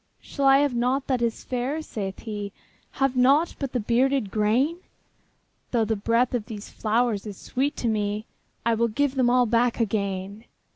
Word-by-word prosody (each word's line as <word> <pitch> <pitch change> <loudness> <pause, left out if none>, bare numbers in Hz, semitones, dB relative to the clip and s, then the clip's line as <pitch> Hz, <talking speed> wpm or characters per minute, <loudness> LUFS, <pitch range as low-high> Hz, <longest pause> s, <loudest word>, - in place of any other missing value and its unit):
``Shall 280 - -3
I 270 0 +7
have 290 -3 +1
nought 250 +3 0
that 255 -3 0
is 235 -1 -1
fair?'' 260 +5 -2
saith 195 -8 -5
he; 205 -3 -5 0.4
``Have 270 -1 +1
nought 275 +7 +4
but 275 -3 -3
the 250 - -1
bearded 245 0 +1
grain? 230 +10 +2 0.9
Though 230 -3 +1
the 220 +1 0
breath 230 +5 +1
of 230 -4 -2
these 215 -3 -8
flowers 220 -1 0
is 200 -3 -7
sweet 280 +3 -2
to 240 - -2
me, 210 -1 -1 0.4
I 230 - +3
will 230 +1 +2
give 270 +5 0
them 255 -3 +2
all 250 0 +4
back 235 +1 +1
again.'' 200 -1 -2
235 Hz, 180 wpm, -25 LUFS, 215-260 Hz, 0.9 s, I